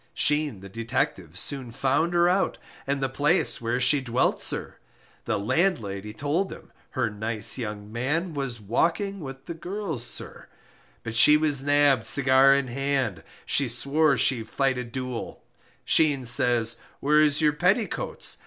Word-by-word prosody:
Sheen, 150 Hz, -8 st, +1 dB
the 100 Hz, -, -10 dB
detective, 95 Hz, -, -3 dB
soon 130 Hz, +2 st, -2 dB
found 140 Hz, +8 st, 0 dB
her 175 Hz, 0 st, +4 dB
out 185 Hz, +2 st, +1 dB, 0.3 s
And 140 Hz, 0 st, -1 dB
the -, -, +2 dB
place 145 Hz, -2 st, +1 dB
where 115 Hz, +2 st, -1 dB
she 130 Hz, +3 st, +3 dB
dwelt, 125 Hz, -1 st, 0 dB
sir, -, -, -4 dB, 0.5 s
The -, -, -1 dB
landlady 105 Hz, -, -1 dB
told 145 Hz, -, -2 dB
him, -, -, -12 dB, 0.3 s
her 125 Hz, -3 st, +1 dB
nice 110 Hz, +3 st, -1 dB
young 105 Hz, -2 st, -6 dB
man 150 Hz, +9 st, -2 dB
Was 135 Hz, -5 st, -4 dB
walking 170 Hz, -, -1 dB
with 135 Hz, -3 st, -9 dB
the 170 Hz, -, -6 dB
girls, 175 Hz, -, -4 dB
sir -, -, -1 dB, 0.6 s
But 115 Hz, -, -5 dB
she 150 Hz, +6 st, +7 dB
was 150 Hz, -3 st, +1 dB
nabbed, 145 Hz, -4 st, +3 dB
cigar 135 Hz, 0 st, +5 dB
in 140 Hz, -2 st, -1 dB
hand, 130 Hz, -, -2 dB, 0.2 s
She 140 Hz, -3 st, +1 dB
swore 140 Hz, +4 st, +2 dB
she 125 Hz, 0 st, +2 dB
fight 130 Hz, +3 st, -1 dB
a -, -, -3 dB
duel, 125 Hz, 0 st, -6 dB, 0.4 s
Sheen 145 Hz, -5 st, +2 dB
says, 120 Hz, -1 st, +2 dB, 0.2 s
where 150 Hz, +2 st, +3 dB
is 150 Hz, -1 st, +3 dB
your 150 Hz, -2 st, +3 dB
petticoats? 195 Hz, +8 st, -1 dB
135 Hz, 155 wpm, -25 LUFS, 115-150 Hz, 0.6 s, she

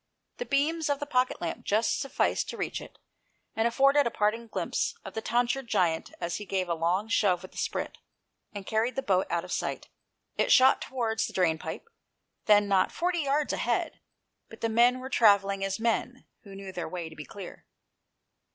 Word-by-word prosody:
The 485 Hz, -, -5 dB
beams 305 Hz, +3 st, +1 dB
of 285 Hz, -1 st, 0 dB
the 290 Hz, -, -3 dB
pocket 255 Hz, -3 st, 0 dB
lamp 170 Hz, -2 st, -4 dB
just 215 Hz, +3 st, +1 dB
sufficed 275 Hz, 0 st, 0 dB
to -, -, -6 dB
reach -, -, -3 dB
it, -, -, -12 dB, 0.6 s
and 225 Hz, +1 st, +2 dB
afforded 275 Hz, +3 st, +4 dB
a -, -, +1 dB
parting 225 Hz, +1 st, -1 dB
glimpse -, -, -2 dB
of -, -, -8 dB
the 220 Hz, -, -3 dB
tonsured 245 Hz, +3 st, 0 dB
giant 165 Hz, -6 st, 0 dB
as 170 Hz, 0 st, -2 dB
he 210 Hz, -, -6 dB
gave 185 Hz, -1 st, -1 dB
a 170 Hz, -, 0 dB
long 175 Hz, +6 st, 0 dB
shove 190 Hz, -5 st, +2 dB
with 185 Hz, -, -10 dB
the -, -, -8 dB
sprit, -, -, -3 dB, 0.5 s
and 205 Hz, -2 st, -7 dB
carried 225 Hz, +4 st, 0 dB
the 270 Hz, -, -2 dB
boat 190 Hz, -5 st, +1 dB
out 170 Hz, 0 st, -1 dB
of 180 Hz, -, -10 dB
sight. -, -, -3 dB, 0.5 s
It -, -, +1 dB
shot 260 Hz, +1 st, +6 dB
towards 230 Hz, -4 st, -1 dB
the -, -, -10 dB
drain 165 Hz, -4 st, +2 dB
pipe, 160 Hz, -, -7 dB, 0.6 s
then 205 Hz, -1 st, +5 dB
not 195 Hz, -2 st, +2 dB
forty 350 Hz, 0 st, -1 dB
yards 290 Hz, 0 st, 0 dB
ahead, -, -, -1 dB, 0.5 s
but -, -, -13 dB
the 230 Hz, -, 0 dB
men 240 Hz, +3 st, +4 dB
were 260 Hz, +1 st, -7 dB
travelling 200 Hz, -4 st, +4 dB
as 195 Hz, +1 st, -2 dB
men 235 Hz, +2 st, -1 dB, 0.2 s
who 195 Hz, -1 st, -12 dB
knew 195 Hz, -1 st, -8 dB
their 175 Hz, -3 st, -5 dB
way 175 Hz, -1 st, -5 dB
to 160 Hz, -, -12 dB
be 150 Hz, -, -7 dB
clear. 195 Hz, +3 st, -10 dB
220 Hz, 195 wpm, -28 LUFS, 190-255 Hz, 0.6 s, shot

